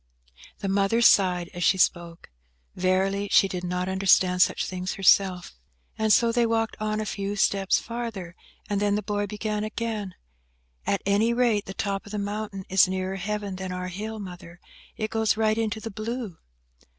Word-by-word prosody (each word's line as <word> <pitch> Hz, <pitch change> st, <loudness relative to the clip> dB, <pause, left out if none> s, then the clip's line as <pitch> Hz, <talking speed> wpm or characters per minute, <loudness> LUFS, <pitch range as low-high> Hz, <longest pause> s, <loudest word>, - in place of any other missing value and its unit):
The 200 Hz, -, -2 dB
mother 195 Hz, +3 st, +2 dB
sighed 180 Hz, -5 st, +4 dB
as 175 Hz, -, -4 dB
she 190 Hz, -, +4 dB
spoke. 170 Hz, -, 0 dB, 0.4 s
Verily, 190 Hz, +2 st, +1 dB
she 195 Hz, -, +6 dB
did 180 Hz, -2 st, -5 dB
not 180 Hz, +1 st, -2 dB
understand 190 Hz, -1 st, +3 dB
such -, -, +3 dB
things 185 Hz, 0 st, -4 dB
herself. 190 Hz, -, +3 dB, 0.4 s
And 220 Hz, 0 st, +1 dB
so 235 Hz, +2 st, +5 dB
they 235 Hz, 0 st, +2 dB
walked 225 Hz, 0 st, 0 dB
on 215 Hz, 0 st, -1 dB
a 215 Hz, -, -2 dB
few 200 Hz, 0 st, -3 dB
steps 195 Hz, -1 st, +2 dB
farther, 225 Hz, -8 st, -6 dB, 0.3 s
and 205 Hz, -1 st, -1 dB
then 205 Hz, 0 st, +2 dB
the 210 Hz, -, -2 dB
boy 205 Hz, 0 st, -2 dB
began 210 Hz, +1 st, -3 dB
again,– 215 Hz, -3 st, -4 dB, 0.7 s
"At 200 Hz, -, 0 dB
any 210 Hz, +4 st, +2 dB
rate, 235 Hz, -4 st, +2 dB
the 195 Hz, -, -8 dB
top 200 Hz, -1 st, -3 dB
of -, -, -10 dB
the 210 Hz, -, -3 dB
mountain 205 Hz, -1 st, -4 dB
is 190 Hz, 0 st, +5 dB
nearer 185 Hz, +1 st, -3 dB
Heaven 200 Hz, 0 st, -4 dB
than 190 Hz, -1 st, -5 dB
our 180 Hz, 0 st, -4 dB
hill, 215 Hz, +4 st, -5 dB
Mother. 180 Hz, -3 st, -10 dB, 0.4 s
It 215 Hz, 0 st, -3 dB
goes 220 Hz, -1 st, +1 dB
right 215 Hz, -1 st, +2 dB
into 220 Hz, -1 st, -2 dB
the 225 Hz, +1 st, -6 dB
blue." 215 Hz, -3 st, -5 dB
200 Hz, 175 wpm, -26 LUFS, 185-215 Hz, 0.7 s, she